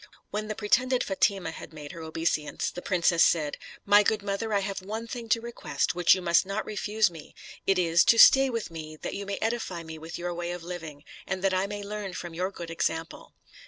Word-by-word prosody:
When 215 +1 -3
the 215 - -3
pretended 250 +5 +2
Fatima 195 -3 0
had 165 - -10
made 150 -2 -8
her 170 - -9
obeisance, 160 -1 -2
the 180 - -7
princess 170 -3 +3
said, 150 -3 +1 0.3
"My 205 +1 +7
good 210 0 0
mother, 200 +2 -2
I 200 -1 +2
have 195 0 -4
one 215 +4 -5
thing 230 -1 -7
to 230 +1 +3
request, 155 -12 -2
which 175 +1 +5
you 185 - -5
must 170 -1 +4
not 195 +3 -3
refuse 210 -1 +1
me: 160 -3 -12 0.3
it 195 - +4
is, 170 -1 +4
to 230 - +5
stay 270 +3 +8
with 230 -7 -3
me, 155 -1 -7
that - - -3
you 200 0 -5
may 200 - -2
edify 220 -7 -2
me 160 -1 -8
with 160 +1 -7
your 175 0 -3
way 175 0 -3
of 175 -1 -7
living, 165 -5 -7 0.2
and 190 0 -3
that 195 -1 +2
I 185 +1 +1
may 205 0 -5
learn 205 -2 -5
from 175 -1 -6
your 180 +3 -1
good 170 -4 -8
example." 165 0 -3
185 Hz, 225 wpm, -27 LUFS, 165-210 Hz, 0.3 s, stay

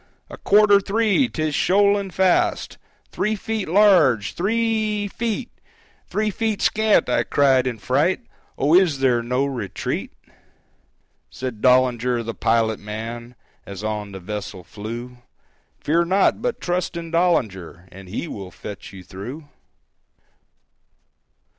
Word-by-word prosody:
"A - - -8
quarter 205 -1 +5
three!—'tis 205 - 0
shoaling 200 +3 +2
fast! 185 0 +1 0.3
Three 215 +1 -1
feet 215 -3 -4
large!—t 170 - +4
h - - -5
r 195 - +1
e 220 -2 0
e - - -3
feet!—Three 215 -1 -5
feet 220 0 -2
scant!" 220 0 +3
I 125 -1 +2
cried 130 +1 +2
in 120 -2 -3
fright 140 - +1 0.4
"Oh, 145 +4 +2
is 175 -5 +4
there 130 -3 +2
no 125 +3 0
retreat?" 120 -8 -4 1.2
Said 125 -4 -6
Dollinger, 125 -1 +3
the 115 0 -5
pilot 110 -1 +1
man, 115 +3 -7 0.3
As 100 0 -9
on 105 -1 -3
the 95 - -8
vessel 95 -1 -6
flew, 120 +6 -8 0.6
"Fear 170 +3 +1
not, 190 +5 +2
but 245 0 -2
trust 175 0 -2
in 165 -1 -7
Dollinger, 105 - 0
And 95 0 -12
he 110 - -4
will 100 -10 -7
fetch 100 +2 -9
you 95 -2 -11
through." 120 - -9
135 Hz, 130 wpm, -22 LUFS, -, 1.2 s, quarter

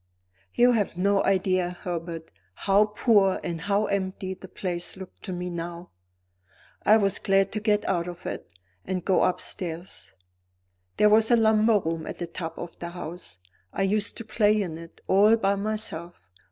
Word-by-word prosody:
You 245 +1 +6
have 210 -7 0
no 200 +2 +2
idea, 185 -2 +1
Herbert, 165 -3 -5 0.2
how 200 +1 +3
poor 210 -2 +3
and 170 -1 -4
how 205 +3 +1
empty 190 -1 -2
the 190 - -11
place 175 -1 -3
looked 190 -1 -11
to 190 - -5
me 180 0 -4
now. 170 +1 -6 0.9
I 215 - +6
was 200 -3 +1
glad 195 -1 +2
to 215 - -2
get 210 -1 +1
out 175 -2 0
of 175 -1 -8
it, - - -5 0.3
and 185 - -3
go 190 - +3
upstairs. 175 -1 -3 0.9
There 210 - +5
was 220 +1 +4
a 240 - +6
lumber 220 -1 +4
room 165 -4 -3
at - - -6
the 175 - -3
top 165 -1 -6
of 175 -1 -8
the 170 - -5
house; 175 - -8 0.3
I - - -1
used 205 +2 0
to 230 - -6
play 215 -1 +3
in 170 -5 -3
it, 165 0 -13
all 205 +4 +5
by 200 -3 +1
myself. 200 -5 -3
190 Hz, 170 wpm, -26 LUFS, 175-210 Hz, 0.9 s, You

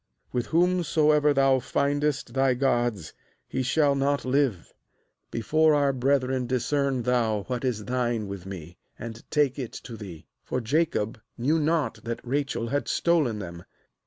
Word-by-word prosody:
32With 120 -2 0
whomsoever 160 -4 +3
thou 135 -1 +4
findest 140 -1 -1
thy 135 -1 +3
gods, 120 - 0 0.3
he - - -2
shall 140 +3 +3
not 140 0 0
live; 130 - 0 0.6
before 155 +7 +3
our 140 -1 +2
brethren 130 -1 +1
discern 130 +1 0
thou 115 -4 +1
what 125 +2 -4
is 115 -5 -1
thine 120 -4 -1
with 95 -2 -7
me, 85 -3 -9 0.2
and 115 0 -8
take 145 -3 +1
it 125 -4 -5
to 120 - -8
thee.' 95 -7 -9
— - - -55
For 130 - -2
Jacob 115 -4 0 0.2
knew 150 +7 +2
not 155 -1 0
that 115 -1 -3
Rachel 135 -3 -1
had 145 +3 -1
stolen 155 -10 +2
them. 85 -4 -7
130 Hz, 150 wpm, -26 LUFS, 115-145 Hz, 0.6 s, thou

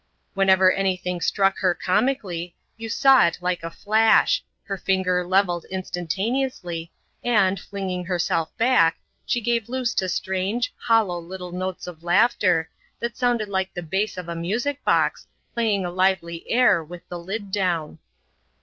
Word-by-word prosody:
Whenever 190 -1 +5
any 190 -1 0
thing 180 -1 -4
struck 195 +1 +1
her 185 -2 +2
comically, 185 -4 -1 0.2
you 225 0 -7
saw 270 +3 +5
it 170 - -3
like 180 0 -1
a 165 - -5
flash 220 - +3
— - - -51
her 200 - -2
finger 185 -1 0
levelled 180 -1 +1
instantaneously, 185 0 -3 0.3
and, 200 -5 +2
flinging 185 -2 -4
herself 170 -2 0
back, 230 -9 +4 0.3
she 240 - +1
gave 235 -1 -1
loose 255 -1 -1
to 185 -1 0
strange, 190 +7 -1
hollow 220 -7 +1
little 180 +1 -8
notes 185 +1 -4
of 175 -3 -9
laughter, 180 -2 +3 0.3
that 235 0 -3
sounded 245 -4 +1
like 190 -1 -2
the 175 - -4
bass 190 +6 -2
of 180 -2 -6
a 170 - -3
music 235 +12 -2
box, - - +1 0.3
playing 215 -5 0
a 175 - -3
lively 180 -2 0
air 235 -9 +4
with 175 +2 -11
the 175 - -6
lid 195 +3 -5
down. 175 -6 -1
190 Hz, 155 wpm, -23 LUFS, 175-220 Hz, 0.3 s, Whenever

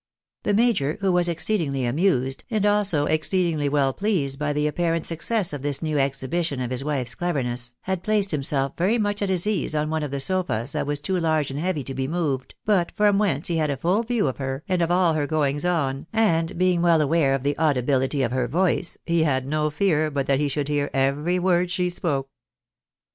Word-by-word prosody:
The 205 - 0
major, 205 - +2
who 195 -1 +2
was 175 -1 +2
exceedingly 160 -6 0
amused, 135 -1 0
and 215 -3 0
also 205 -8 +3
exceedingly 155 -2 0
well 140 -2 +1
pleased 155 -10 -1
by 150 0 -1
the 150 +1 0
apparent 165 +1 0
success 170 +2 0
of 145 - -5
this 145 +2 -1
new 155 -2 0
exhibition 135 +2 -1
of 125 -1 -3
his 130 +1 +1
wife's 135 -5 -1
cleverness, 125 -6 -2
had 190 -2 -3
placed 205 0 +1
himself 140 -2 0
very 195 +7 +1
much 205 -2 -1
at 200 - 0
his 185 -1 +1
ease 205 -7 -1
on 155 +1 -1
one 160 0 -1
of 150 - -3
the 140 +1 -3
sofas 140 -6 0
that - - -2
was 145 0 -1
too 185 +4 -1
large 155 -4 0
and 140 - -4
heavy 170 -3 -1
to 135 - -6
be 130 0 -2
moved, 150 -5 -2
but 195 -5 +2
from 205 -1 +3
whence 175 -8 0
he 170 - 0
had 155 -2 +1
a 140 - -1
full 180 - +1
view 230 -6 0
of 130 - -3
her, 135 +1 -4
and 185 -2 0
of 170 - +1
all 175 -2 +3
her 150 -2 -1
goings 145 -1 0
on, 145 -6 -1
and 180 -6 +1
being 180 -1 +2
well 170 -2 +4
aware 150 -2 +2
of 135 - -4
the 145 0 0
audibility 135 -2 +1
of 120 - -1
her 125 -1 0
voice, 175 +5 0
he 170 -1 +1
had 130 -4 +1
no 150 +2 0
fear 155 -1 +1
but 140 -2 -2
that 135 -1 +1
he 150 - +1
shoujd 140 0 -2
hear 145 -1 0
every 140 +6 +1
word 180 -1 +1
she 180 0 0
spoke. 145 -6 -2
155 Hz, 220 wpm, -24 LUFS, 140-180 Hz, -, well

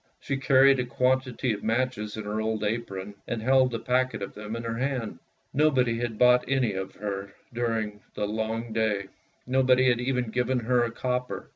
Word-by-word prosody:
She 140 - -3
carried 135 0 +5
a - - +1
quantity 125 -1 0
of 105 - -6
matches 110 -2 -1
in 110 - -4
her 105 +1 -2
old 110 0 -1
apron, 105 -3 -3
and 120 - -2
held 130 +2 +3
a - - 0
packet 125 -2 0
of 100 - -6
them 105 +1 -6
in 115 - -5
her 115 0 -3
hand. 130 -4 -2 0.3
Nobody 130 -5 +2
had 120 -2 -3
bought 125 +1 +5
any 130 -5 +1
of 95 0 -5
her 100 -1 -5 0.2
during 115 -3 -1
all 105 - -20 0.2
the 105 - -1
long 110 +2 -3
day; 105 -3 0 0.4
nobody 130 0 +3
had 120 -1 +2
even 125 -2 -1
given 125 +1 0
her 120 +1 +2
a 120 - 0
copper. 125 -5 -3
120 Hz, 190 wpm, -27 LUFS, 110-125 Hz, 0.4 s, carried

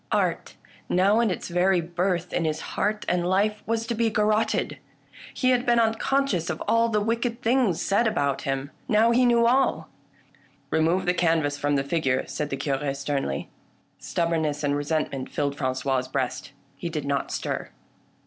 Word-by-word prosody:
Art, - - 0 0.3
now 195 +5 +3
in 235 -2 +3
its 180 - -3
very 180 +1 +2
birth 175 +1 -2
in 175 - 0
his 155 0 -1
heart 210 +1 -1
and 180 -1 +1
life, 200 +4 +1
was 225 0 0
to 235 - -2
be 230 0 +1
garrotted. 215 0 +1 0.5
He 255 -1 +1
had 245 -1 +2
been 240 -2 +3
unconscious 225 -4 +1
of - - -3
all 230 0 +3
the 210 -2 +1
wicked 230 +3 -1
things 230 -7 +2
said 215 +4 +2
about 140 -10 0
him: 135 +1 -3 0.2
now 225 +1 +4
he 250 +1 +4
knew 235 -1 +4
all! 260 +3 +2 0.4
" - - -33
Remove 165 +4 +2
the 180 - +2
canvas 160 -5 +1
from 145 0 +1
the 135 - +1
figure," 140 -4 0
said 150 -1 -4
the 135 - -3
Cure 140 0 -2
sternly. 140 - -3 0.5
Stubbornness 160 -3 -1
and 145 0 +1
resentment 145 -2 -2
fiilled 140 -1 -1
Frangois' 130 -1 -1
breast. - - -2 0.3
He 170 - -4
did 155 -3 -4
not 140 -1 -1
stir. - - -3
175 Hz, 170 wpm, -25 LUFS, 145-225 Hz, 0.5 s, now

